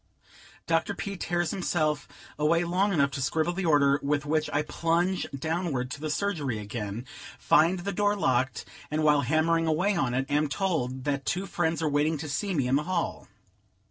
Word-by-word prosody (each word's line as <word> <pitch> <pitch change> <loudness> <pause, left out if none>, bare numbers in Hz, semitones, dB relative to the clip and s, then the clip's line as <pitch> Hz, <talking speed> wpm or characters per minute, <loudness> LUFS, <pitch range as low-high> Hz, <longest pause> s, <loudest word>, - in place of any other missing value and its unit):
Dr. 165 +4 0
P. 200 +2 -4
tears 175 -2 -1
himself 155 -6 0 0.3
away 165 +3 +3
long 185 +4 +1
enough 140 -6 +2
to 140 - -4
scribble 160 +5 0
the 185 -1 -2
order, 140 -2 +4
with 145 +1 0
which 155 +1 0
I 150 - +1
plunge 170 +4 0
downward 140 -3 -2
to 145 - -6
the 155 - -3
surgery 150 - -1
again, 105 +2 -5 0.3
find 170 +4 +4
the 190 +3 -3
door 205 +2 +1
locked, 130 -8 0 0.2
and, 155 +1 -1
while 150 -1 +4
hammering 165 +2 +2
away 180 +6 +2
on 130 -7 0
it, 135 +1 0
am 145 +1 +1
told 140 -8 -1
that 140 -1 -1
two 185 +7 -1
friends 165 -3 -1
are - - +2
waiting 150 +2 +1
to 155 +2 -6
see 180 +7 -2
me 135 -5 +1
in 130 +2 +3
the 150 - -1
hall. 175 -3 -2
155 Hz, 185 wpm, -27 LUFS, 140-175 Hz, 0.3 s, order